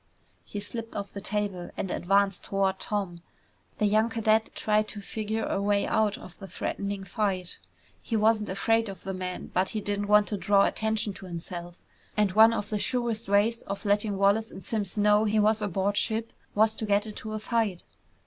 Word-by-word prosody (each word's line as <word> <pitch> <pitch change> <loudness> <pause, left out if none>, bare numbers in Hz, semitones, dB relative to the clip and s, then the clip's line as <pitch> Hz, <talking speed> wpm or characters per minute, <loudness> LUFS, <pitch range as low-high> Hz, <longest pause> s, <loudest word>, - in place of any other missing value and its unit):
He 205 - -6
slipped 225 +2 -6
off 200 0 -5
the 200 - -6
table 200 -3 -2
and 190 - -3
advanced 195 +1 +1
toward 195 -1 0
Tom. 190 -5 -3 0.6
The 210 - +1
young 215 +2 +3
cadet 220 -1 +2
tried 215 0 +1
to 210 - -6
figure 220 +2 -3
a 195 - -1
way 200 0 +2
out 215 -2 +1
of 180 - -12
the 195 - -8
threatening 200 0 -3
fight. 190 -4 -2 0.4
He 230 - -3
wasn't 215 0 +3
afraid 225 +3 +1
of 195 - -9
the 195 - -4
man, 185 -1 -5
but 185 +1 +1
he 220 - -2
didn't 205 0 -2
want 210 0 +5
to 210 - -2
draw 200 +1 +4
attention 220 -1 0
to 190 0 -11
himself. 175 0 -7 0.3
And 210 -2 +3
one 220 +3 +7
of 210 -3 -3
the 210 - 0
surest 235 -3 -1
ways 210 +3 +3
of 200 +2 -5
letting 205 0 +1
Wallace 200 +3 +3
and 190 - -10
Simms 210 -3 -1
know 210 +1 +4
he 215 0 +2
was 215 +1 +3
aboard 200 0 0
ship 225 0 -1 0.2
was 220 +1 +4
to 220 - -3
get 205 +1 +2
into 215 0 -7
a - - -2
fight. 215 -4 -1
205 Hz, 195 wpm, -28 LUFS, 195-220 Hz, 0.6 s, one